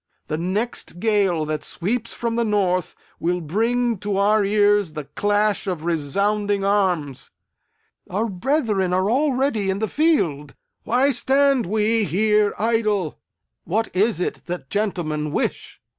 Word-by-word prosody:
The 155 - -1
next 190 0 -3
gale 195 -7 +1
that 150 -1 -3
sweeps 225 +10 -3
from 230 -1 -3
the 235 - +1
north 190 -5 0 0.2
will 175 +1 0
bring 230 +7 0
to 205 0 -2
our 210 +1 +3
ears 205 -3 +2
the 150 -1 -5
clash 205 +6 0
of 175 -5 -3
resounding 200 +6 0
arms! 175 -10 0 0.8
Our 205 +5 -1
brethren 210 - 0
are 190 +3 +1
already 265 -6 +1
in 190 - 0
the 220 +2 -1
field! 170 - 0 0.3
Why 260 +4 +3
stand 270 -1 +2
we 215 +2 +1
here 210 +4 +2
idle? 215 -7 0 0.4
What 215 +5 -2
is 205 +1 +2
it 180 - -3
that 175 -6 -6
gentlemen 165 -8 -1
wish? - - -3
205 Hz, 135 wpm, -22 LUFS, 180-225 Hz, 0.8 s, our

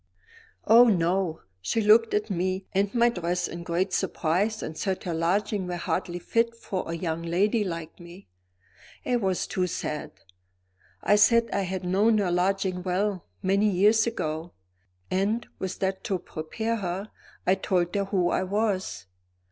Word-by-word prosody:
"Oh! 235 +2 +8
no. 180 -4 +1 0.2
She 160 - 0
looked 220 +1 +5
at 210 0 -1
me 185 +1 -1
and 195 +1 +1
my 235 0 +5
dress 180 -4 -1
in 170 - -7
great 175 +3 -1
surprise 195 +7 0
and 155 - -5
said 190 +3 -2
her 175 - -3
lodgings 190 +4 0
were 175 - -2
hardly 175 0 -2
fit 230 +6 0
for 190 -6 -4
a 165 - -2
young 165 -1 -3
lady 195 +6 +1
like 165 -3 -6
me. 175 +3 -13 0.8
It 245 -2 0
was 190 -2 0
too 185 -1 -1
sad. 165 -3 -4 0.9
I 205 - +4
said 230 +2 +4
I 200 - +1
had 190 -1 -3
known 205 +5 +3
her 195 -4 +1
lodgings 185 0 0
well, 190 0 -1 0.2
many 200 +3 +3
years 210 +4 +4
ago 160 -6 -3 0.6
and, 200 +5 0
with 190 -1 -4
that 190 0 -1
to 195 -5 0
prepare 220 +7 -4
her, 195 +1 -4 0.3
I 185 - +4
told 180 -2 0
her 200 -1 0
who 185 -3 +1
I - - +1
was. 190 - -1
190 Hz, 160 wpm, -26 LUFS, 175-210 Hz, 0.9 s, Oh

